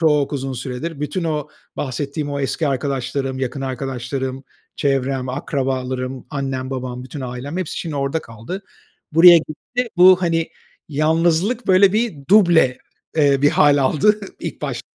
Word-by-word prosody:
çok 150 -3 +2
uzun 135 -1 -3
süredir 135 +5 -5
bütün 150 +4 -2
o 150 -2 -2 0.3
bahsettiğim 145 +2 -3
o 140 0 -2
eski 145 +3 -1
arkadaşlarım, 135 0 -2
yakın 130 +1 -3
arkadaşlarım, 130 0 -4 0.3
çevrem, 135 -2 0
akrabalarım, 130 -1 -3
annem, 135 -2 -3
babam, 125 -1 -5
bütün 135 +3 -8
ailem, 130 +5 -5
hepsi 185 - -3
şimdi 160 -4 -4
orada 140 +3 -1
kaldı. 115 - -8 0.5
Buraya 170 +2 +9
gitti, 235 +11 -4
bu, 185 +1 +7
hani, 165 -1 0 0.4
yalnızlık 165 - +1
böyle 190 +1 +5
bir 225 -2 0 0.2
duble, 170 -11 +5 0.4
eee, 140 -2 +3
bir 145 - +5
hâl 145 -1 +4
aldı 210 +10 +3 0.2
ilk - - -6
baş - - -3
140 Hz, 140 wpm, -20 LUFS, 130-165 Hz, 0.5 s, Buraya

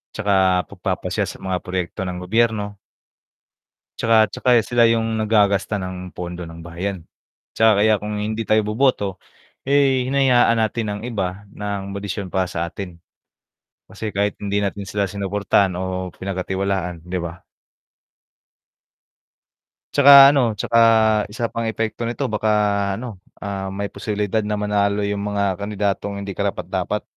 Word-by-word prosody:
'Tsaka 95 -3 +2
pagpapasya - - -2
sa - - -9
mga 95 -1 -1
proyekto 90 +2 -4
ng 90 0 -4
gobyerno. 105 0 0 1.2
'Tsaka 115 0 +3 0.2
tsaka 125 - -2
sila 120 0 +2
yung 115 -1 +1
naggagasta 105 -2 +2
ng 90 0 -6
pondo 90 0 -6
ng 85 0 -10
bayan, 85 +1 -5 0.5
'tsaka 110 -2 +4
kaya 110 0 +4
kung 105 0 -4
hindi 110 +2 -2
tayo 110 0 +3
boboto, 105 -3 0 0.5
eh, 135 -2 +3
hinayaan 125 -4 +4
natin 110 +1 0
ng - - -11
iba 100 -3 -3
ng 100 -1 -4
modisyon 100 -1 -5
pa 95 -1 +1
sa 85 -1 -2
atin. 90 0 -8 0.9
Kasi 110 - -5
kahit 100 +1 0
hindi 100 0 0
natin 100 0 -3
sila 100 -1 -1
sinuportahan 100 0 +1
o 95 0 -3
pinagkatiwalaan, 95 -2 -3
'di 90 +1 -3
ba? 85 0 -7 2.5
'Tsaka, 140 0 +7 0.2
ano, 140 - +3
tsaka 115 +3 0 0.5
isa 115 +2 -4
pang 115 -1 -2
epekto 115 +1 -2
nito, 120 - -3
baka, 110 0 0 0.5
ano, 115 -5 -7 0.2
ah, 100 -1 -4
may 100 +1 -4
posibilidad 105 0 -2
na 105 0 -2
manalo 105 0 0
yung 100 0 -1
mga 100 -2 -1
kandidatong 100 -1 -2
hindi 100 - -5
karapat-dapat. - - -2
100 Hz, 135 wpm, -21 LUFS, 95-110 Hz, 2.5 s, Tsaka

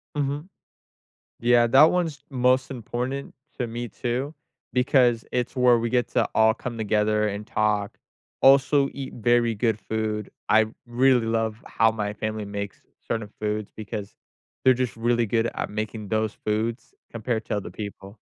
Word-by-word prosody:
Mhm. 145 +4 -2 0.9
Yeah, 120 0 +4
that 135 +6 +7
one’s 165 -6 -1
most 130 0 +2
important 125 +3 -4 0.3
to 125 - 0
me, 120 +1 -4
too, 125 +7 -3 0.4
because 125 -2 +3
it’s 125 0 -2
where 125 -1 +5
we 115 0 -1
get 125 0 +1
to - - +1
all 110 0 +5
come 120 0 -6
together 105 0 +1
and 100 +1 -4
talk, 105 -2 0 0.4
also 140 +1 +5
eat 135 -1 -6
very 120 0 +2
good 110 0 0
food. 110 0 -3 0.2
I 110 0 +5 0.2
really 125 0 +3
love 115 -1 -1
how 115 0 +3
my 105 -2 -3
family 110 0 -4
makes 100 -1 -6 0.3
certain 110 -2 -2
foods 105 -1 -2
because 105 -1 -6 0.5
they’re 130 -1 +6
just 125 -1 -2
really 120 +1 +2
good 115 +2 +1
at - - -3
making 110 0 -4
those 110 -1 0
foods 110 +3 -2 0.2
compared 115 -1 -2
to - - -2
other 100 - -5
people. 100 0 -8
115 Hz, 155 wpm, -25 LUFS, 105-125 Hz, 0.9 s, that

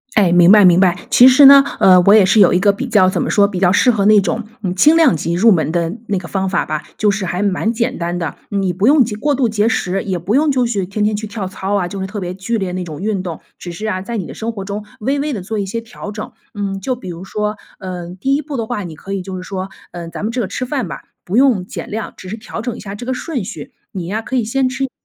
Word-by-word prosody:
哎， 195 -5 +4
明 175 +1 +6
白 210 0 +7
明 180 -1 +6
白， 185 -2 +3
其 250 - +7
实 260 +2 +7
呢， 275 0 +9 0.2
呃， 185 -1 +6
我 200 +3 +5
也 215 -2 +7
是 190 +4 +3
有 190 - +6
一 180 - +3
个 200 +2 +4
比 200 +7 -5
较 200 -5 +4
怎 - - -2
么 - - -1
说， 200 -2 +4
比 195 -3 -5
较 180 -1 +3
适 250 - +3
合 210 -5 +2
那 210 -1 +6
种， 200 +5 -2 0.2
嗯， 185 -3 -3
轻 300 - +5
量 315 - +4
级 170 +3 -2
入 210 +7 +4
门 160 -5 +1
的 170 -1 -1 0.2
那 200 -3 -1
个 180 - -9
方 190 -1 -2
法 185 - -1
吧， 155 -1 -3 0.2
就 210 - +3
是 195 -1 -1
还 180 +1 -3
蛮 205 +3 0
简 240 +3 -2
单 175 +1 -3
的。 165 -4 -4
你 195 -2 -1
不 195 +4 -1
用 280 +2 +6
节 215 -2 -4
过 290 +8 0
度 255 -4 +1
节 210 0 +1
食， 195 -4 -1
也 190 -4 -3
不 195 +7 -1
用 295 +1 +3
就 255 -3 +1
去 200 -5 -2
天 200 +3 -3
天 210 0 +1
去 215 +1 -4
跳 210 -2 -5
操 195 +1 -4
啊， 180 -3 0
就 195 +1 -7
是 190 - -3
特 205 +2 -6
别 180 -2 -4
剧 220 +5 -2
烈 190 -2 -3
那 185 0 -3
种 160 -2 -8
运 200 -2 -2
动， 170 -3 -6 0.2
只 175 - -8
是 210 +6 -6
啊， 185 -3 -2
在 235 +4 -5
你 190 - -4
的 - - -9
生 225 +1 -4
活 205 -4 -7
中 205 +2 -6
微 270 +6 -1
微 295 +1 -2
地 210 - -4
做 215 +4 -5
一 200 - -1
些 230 +4 -4
调 225 -2 -9
整。 215 0 -7 0.2
嗯， 200 -2 -4
就 255 +7 -2
比 210 -7 -9
如 170 +1 -7
说， 210 +2 -3 0.2
呃， 180 -3 -7
第 270 +7 +1
一 290 - -1
步 295 -1 -6
的 230 -3 -3
话， 230 -4 -3
你 165 -3 -8
可 195 +6 -8
以 195 -2 -3
就 190 0 -7
是 185 - -6
说， 190 0 -5 0.2
嗯， 170 -1 -7
咱 - - -7
们 215 +3 -2
这 250 - -3
个 205 - -2
吃 200 - -4
饭 255 - -2
吧， - - -7 0.2
不 195 +6 -1
用 250 -9 +3
减 - - -7
量， 220 +1 -5
只 185 - -11
是 220 - -5
调 225 0 -7
整 240 0 -4
一 - - -10
下 195 -1 -8
这 205 - -8
个 260 - -1
顺 260 - -4
序， 265 - -8 0.2
你 185 -3 -5
呀 210 +6 -3
可 260 - -5
以 245 - +1
先 255 +4 0
吃 260 +1 -4
一 270 - 0
些 - - -24
205 Hz, 330 characters per minute, -17 LUFS, 185-230 Hz, 0.2 s, 呢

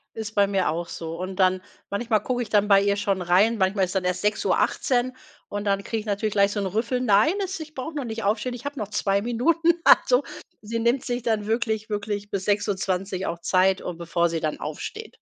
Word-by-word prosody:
ist 220 -1 -6
bei 200 -1 +4
mir 195 -2 +1
auch 170 +2 -3
so. 165 0 -6
Und 185 +1 -5
dann 185 -1 +2 0.3
manchmal 215 0 0
gucke 245 +1 -1
ich 230 - -6
dann 210 -1 +3
bei 200 -1 +6
ihr 200 0 +2
schon 195 -2 0
rein, 195 +6 +3
manchmal 190 0 +2
ist 185 - -5
dann 190 -1 0
erst 180 0 -1
6:18, 245 +4 +1 0.3
und 205 0 -4
dann 200 -1 +1
kriege 225 - -2
ich 215 - -11
natürlich 210 +1 -1
gleich 200 0 +3
so 205 - -2
'n 200 - -1
Rüffel: 230 +6 -1
„Nein, 225 - +4
es 380 -1 -5
ich 310 0 -9
brauche 300 +4 -5
noch 290 -3 -3
nicht 225 -1 -5
aufstehen, 215 +5 0
ich 245 +1 -9
habe 285 -1 -5
noch 210 - -3
2 200 -1 +1
Minuten.“ 320 +9 +2
Also, - - +5 0.4
sie 230 +2 -3
nimmt 240 +3 +1
sich 245 -1 -2
dann 220 -3 0
wirklich 220 -1 -1
wirklich 205 0 -3
bis 195 -1 -3
6:20 195 -2 -1
auch 170 0 -4
Zeit, 185 +2 +2
äh, 180 - -4
bevor 170 0 0
sie 165 -1 -2
dann 155 -1 -2
aufsteht. 290 - -6
205 Hz, 225 wpm, -24 LUFS, 190-235 Hz, 0.4 s, bei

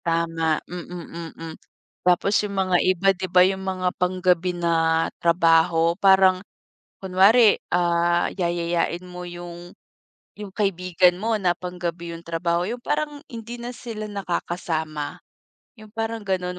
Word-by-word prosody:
Tama 165 -1 0
mm, 170 -1 -8
mm, 165 -1 -7 0.5
tapos 180 +3 +2
yung 200 -1 -5
mga 185 -2 +2
iba 185 +1 +1
di 185 0 -5
ba 180 +1 +6
yung 190 0 -1
mga 185 -1 -2
panggabi 180 -1 +1
na 165 -1 +2 0.2
trabaho 165 0 +3
parang, 190 0 +4 0.6
kunwari 200 +4 +5 0.2
ah, 175 0 +2
yayayain 170 0 -1
mo 180 0 -9
yung 175 0 -9 0.7
yung 205 -1 -6
kaibigan 180 -3 +2
mo 225 +1 +1
na 180 -3 +2
pang-gabi 175 -1 -5
yung 165 - -11
trabaho 170 +1 -1
yung 240 +3 -5
parang 295 -1 -2
hindi 230 0 -7
na 240 - -5
sila 220 -3 -6
nakakasama. 165 -6 -3 0.6
Yung 215 - -13
parang 225 0 -3
ganon, 180 -1 -2
180 Hz, 130 wpm, -23 LUFS, 170-190 Hz, 0.7 s, ba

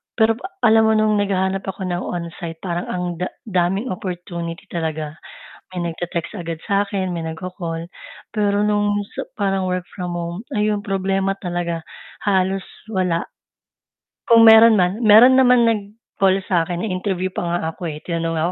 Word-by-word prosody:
pero 225 -1 +4
pa - - -6 0.2
alam 220 -1 +5
mo 220 - +3
no'ng 215 -1 +3
naghahanap 195 -1 0
ako 190 0 -4
ng 175 - -1
on-site, 170 -1 -6
parang 175 -1 -3
ang 180 0 -3 0.2
da 180 - -1 0.2
daming 195 +2 0
opportunity 175 -3 -5
talaga, 160 -3 -3 0.6
may 180 - -2
nagte-text 175 +4 -5
agad 165 -1 -5
sa'kin, 200 -2 0
may 165 -2 -4
nagko-call, 165 0 -5 0.4
pero 205 -1 +1
no'ng 205 0 +1 0.2
sa - - -6
parang 195 -2 0
work 180 0 -1
from 180 -2 -5
home, 170 +1 -4 0.2
ayun, 210 -1 0
problema 195 0 0
talaga, 175 -2 -2 0.4
halos 190 -1 +1 0.3
wala. 180 -3 0 1.0
Kung 230 -1 +8
meron 225 0 +8
man 185 +5 +1
meron 225 +4 +8
naman 250 -2 +5
nag-call 200 -3 0
sa 175 -3 +2
akin, 175 +3 -3
na-interview 185 -1 -2
pa - - -3
nga 175 0 -1
ako, 175 -3 -5
eh, 150 - -6
tinanong 165 -1 -2
nga 155 - 0
185 Hz, 155 wpm, -20 LUFS, 175-205 Hz, 1.0 s, Kung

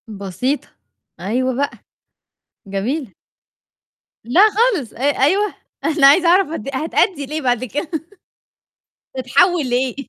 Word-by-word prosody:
بسيطة. 210 - -3 0.5
أيوه 250 +8 -1
بقى. 280 +2 -1 1.0
جميلة. 210 +5 -3 1.1
لأ، 250 - +3
خالص 420 - 0
أ - - -15 0.2
أيوه. 390 +8 +2 0.3
أنا 305 -3 +4
عايزة 340 +5 +5
أعرف 370 +3 +4
هت 275 -3 -6
هتأدّي 310 +2 0
لإيه 305 +3 -4
بعد 245 -2 0
كده 290 - -4 1.3
تتحوّل 285 +3 +2
لإيه؟ 250 0 0
275 Hz, 105 wpm, -19 LUFS, 245-330 Hz, 1.3 s, عايزة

